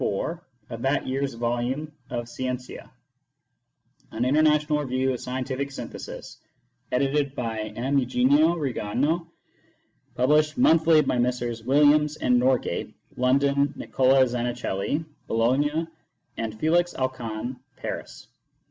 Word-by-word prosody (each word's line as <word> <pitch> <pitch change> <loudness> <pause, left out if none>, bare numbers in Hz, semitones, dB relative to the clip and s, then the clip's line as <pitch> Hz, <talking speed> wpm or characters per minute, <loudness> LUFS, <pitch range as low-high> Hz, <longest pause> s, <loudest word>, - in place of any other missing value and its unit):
4 165 - -2 0.3
of 115 - -6
that 135 +2 +1
year 130 +1 -2
s 135 -4 -2
volume 120 +6 -2 0.2
of 120 -1 -4
Scientia, 125 +1 -5 1.2
an 115 +2 -2
International 150 +2 +3
Review 130 -1 0
of 125 - -4
Scientific 130 +2 -3
Synthesis, 135 - -8 0.5
edited 140 +2 +1
by 110 -3 -3
M. 135 +4 +1
Eugenio 140 +6 +3
Rignano, 145 +3 -1 0.9
published 150 +4 +3
monthly 160 -1 +5
by 125 - 0
Messrs. 120 -2 -1
Williams 150 +3 +4
and 125 -1 +3
Norgate, 125 -8 0 0.2
London, 140 +2 +2
Nicola 130 0 +3
Zanichelli, 120 +2 -2 0.2
Bologna, 145 +8 +1 0.5
and 110 -1 -5
Felix 175 +3 +2
Alcan, 125 -2 -3 0.2
Paris. - - -6
130 Hz, 110 wpm, -25 LUFS, 120-150 Hz, 1.2 s, monthly